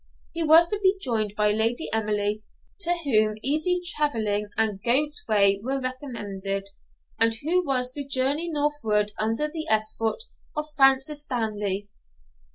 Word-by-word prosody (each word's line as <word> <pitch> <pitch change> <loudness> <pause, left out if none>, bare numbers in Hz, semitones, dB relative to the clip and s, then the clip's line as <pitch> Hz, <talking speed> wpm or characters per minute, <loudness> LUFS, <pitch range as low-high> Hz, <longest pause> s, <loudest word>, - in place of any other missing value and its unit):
He 330 - -4
was 325 +2 +6
to 420 - -1
be 385 0 +3
joined 220 - -1
by 210 0 +2
Lady 225 +7 0
Emily, 210 -1 0 0.4
to 350 -2 +3
whom 215 -6 +2
easy 315 +6 +1
travelling 220 -11 -1
and 215 -3 0
goat's 290 +6 +1
whey 200 -2 +4
were 270 +3 -1
recommended, 205 -7 -4 0.5
and 225 0 +3
who 335 +10 0
was 255 -4 0
to 285 +2 -3
journey 275 +5 0
northward 290 -9 0
under 225 +7 0
the 315 +1 -5
escort 220 - +1 0.3
of 300 - -1
Francis 270 +2 +3
Stanley. 210 -7 -2
245 Hz, 140 wpm, -25 LUFS, 215-295 Hz, 0.5 s, was